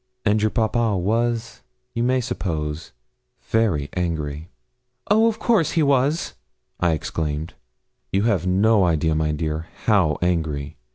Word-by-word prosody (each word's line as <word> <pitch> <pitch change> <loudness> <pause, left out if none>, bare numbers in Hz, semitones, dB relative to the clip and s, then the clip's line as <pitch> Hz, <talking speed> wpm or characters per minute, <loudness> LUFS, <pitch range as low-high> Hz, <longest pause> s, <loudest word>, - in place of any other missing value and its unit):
'And 105 0 +3
your 110 - +3
papa 110 -2 +1
was, 115 +4 -1 0.3
you 115 - -2
may 130 +1 +2
suppose, 80 -9 -4 0.5
very 100 -11 +1
angry.' 80 -3 -3 0.6
'Of 220 +1 +3
course 180 - +2
he 165 - +3
was,' 140 +3 +1 0.5
I 85 -2 +2
exclaimed. 80 0 -3 0.6
'You 100 +1 +1
have 100 -6 +1
no 100 +3 +4
idea, 80 -2 +2
my 75 0 0
dear, 80 +1 -3 0.2
how 95 -9 +3
angry. 80 -5 -1
95 Hz, 125 wpm, -22 LUFS, 80-115 Hz, 0.6 s, no